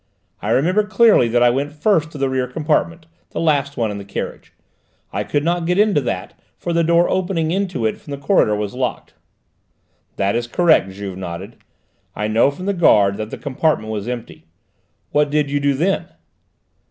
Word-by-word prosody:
I - - -3
remember 180 +10 +2
clearly 215 - +4
that 120 +1 +2
I 120 - +5
went 140 +4 -2
first 160 0 +1
to 155 - -10
the 135 -1 0
rear 130 -1 -1
compartment, 160 +4 -1 0.2
the - - -5
last 145 -3 +1
one 115 -3 0
in 100 - -5
the - - -7
carriage. 100 - -6 0.6
I - - -1
could 145 - -1
not 170 +1 0
get 180 +1 +1
into 205 -7 +3
that, 125 - -4 0.2
for 170 - -3
the 170 0 +2
door 170 +1 +3
opening 175 -4 0
into 185 - -1
it 110 - -1
from - - -16
the 140 - -4
corridor 140 - +2
was 105 -1 -3
locked." 125 -1 -3 1.0
"That 100 +2 0
is 120 0 -1
correct," 160 - +3
Juve 95 -1 -7
nodded. 95 +4 -7 0.6
"I 105 - -2
know 110 +5 +3
from 160 +6 -7
the 200 - 0
guard 100 - +4
that 110 0 -4
that - - -9
compartment 140 -5 0
was 105 0 -4
empty. 120 -2 -7 0.6
What 150 0 +2
did 145 -1 0
you 145 - +1
do 140 -1 +1
then?" 180 +8 0
145 Hz, 190 wpm, -19 LUFS, 115-170 Hz, 1.0 s, I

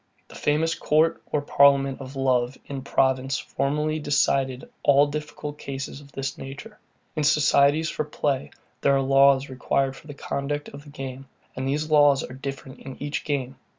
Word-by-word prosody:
The - - -13
famous 160 +3 +1
court 160 +2 +2
or 145 - -1
parliament 140 -1 +4
of 135 +1 -9
love 130 -1 +1
in 140 -1 -6
Provence 130 0 +1
formerly 150 +3 -1
decided 135 -3 +1
all 145 0 +5
difficult 150 0 -6
cases 135 +1 -6
of 140 -1 -16
this 135 -1 -4
nature. 150 +12 -9 0.4
In 155 - -1
societies 150 +1 +3
for - - -2
play, 145 -2 -2 0.3
there 140 - +4
are 135 - +2
laws 135 0 +4
required 135 +1 -1
for 155 - -15
the 145 - -8
conduct 145 +1 -3
of 145 +1 -12
the - - -12
game; 135 -1 -7 0.3
and 130 +1 -3
these 150 +3 -1
laws 145 -2 +5
are 125 - -8
different 135 0 -7
in 135 -1 -9
each 145 0 -3
game. 135 -3 -2
140 Hz, 170 wpm, -25 LUFS, 135-150 Hz, 0.4 s, all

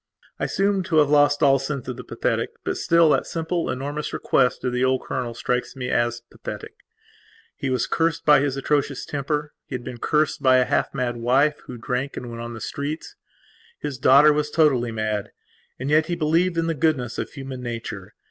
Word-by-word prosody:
I - - 0
seem 195 0 +1
to 170 - -1
have 145 -2 +4
lost 145 0 +4
all 135 -1 +5
sense 135 -1 -4
of 125 - -4
the - - -8
pathetic; - - -1
but - - -2
still, 170 -2 +4
that - - +1
simple, 165 +1 -2
enormous 145 +3 -4
request 125 -2 +1
of 125 - -1
the 125 +1 +1
old 130 0 +1
colonel 120 -2 -4
strikes 125 +2 -2
me 125 -1 -4
as 120 0 0
pathetic. - - -8 0.8
He 135 - -3
was 130 -2 +1
cursed 165 -1 0
by 150 -2 +7
his 140 -1 -1
atrocious 140 -1 0
temper; 150 +1 -3
he 130 - -5
had 125 - -5
been 120 0 -7
cursed 150 +1 +1
by 130 -2 +5
a 125 - +3
half - - 0
mad 120 -1 -1
wife, 135 +6 +2
who 125 - -7
drank 125 +4 -3
and 120 -1 -6
went 115 0 -7
on 120 0 -6
the 110 - -9
streets. 145 +7 -5 0.6
His 140 -3 -5
daughter 140 +4 +7
was 150 0 -1
totally 140 -7 +2
madand 110 -2 -2 0.5
yet 150 +4 +2
he 175 - -1
believed 170 +2 +1
in 165 - +1
the 165 - 0
goodness 145 -6 0
of - - -3
human 135 -3 -7
nature. 115 -5 -6
135 Hz, 200 wpm, -23 LUFS, 125-150 Hz, 0.8 s, by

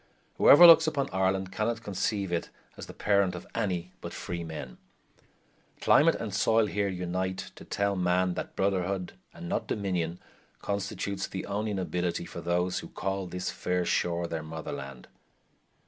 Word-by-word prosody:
Whoever 175 +5 +9
looks 165 -1 +9
upon 140 -3 -1
Ireland 95 0 0
cannot 110 +3 -2
conceive 100 -1 -2
it 85 -1 -2 0.3
as - - -9
the - - -9
parent 100 -3 +2
of 90 - -8
any 90 -6 -2
but - - -7
freemen. 80 -8 -6 1.0
Climate - - +5
and - - -5
soil 115 0 +3
here 100 -1 -1
unite 95 0 -3
to - - -11
tell 100 0 -1
man 90 0 +1
that - - -6
brotherhood, 95 -1 -1 0.2
and 85 +1 -9
not - - -2
domination, 90 -4 -2 0.4
constitutes 100 -1 -3
the 95 - -5
only 105 +1 -2
nobility 90 -2 -2
for - - -8
those 90 +1 0
who - - -8
call 95 -1 -3
this 90 +1 -3
fair 90 -1 -1
shore 85 0 0
their 80 -1 -3
motherland. 70 -5 -7
95 Hz, 150 wpm, -29 LUFS, 90-100 Hz, 1.0 s, Whoever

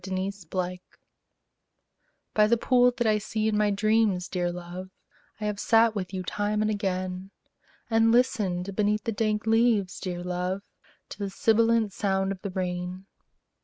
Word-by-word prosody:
THE 190 - -7 0.4
POOL 180 -1 -2 1.5
By 210 0 +4
the 235 +2 +3
pool 250 +1 +4
that 245 -1 -2
I 215 -1 +3
see 215 +1 -2
in 220 - +1
my 210 0 +3
dreams, 205 -2 +2
dear 175 -1 -1
love, 180 +1 -7 0.5
I 215 - -3
have 210 -1 -2
sat 225 0 +4
with 190 -4 -4
you 185 -1 -4
time 210 +3 -1
and 215 - +1
again; 185 -2 -3 0.6
And 225 0 +3
listened 200 -6 +1
beneath 210 0 +1
the 230 - -1
dank 215 0 -1
leaves, 225 -4 +2
dear 175 -1 -4
love, 180 +2 -2 0.5
To - - -9
the 200 -1 -2
sibilant 225 +1 +2
sound 195 -1 0
of 190 -1 -6
the 200 - -4
rain. 180 0 -4
205 Hz, 160 wpm, -27 LUFS, 185-220 Hz, 1.5 s, By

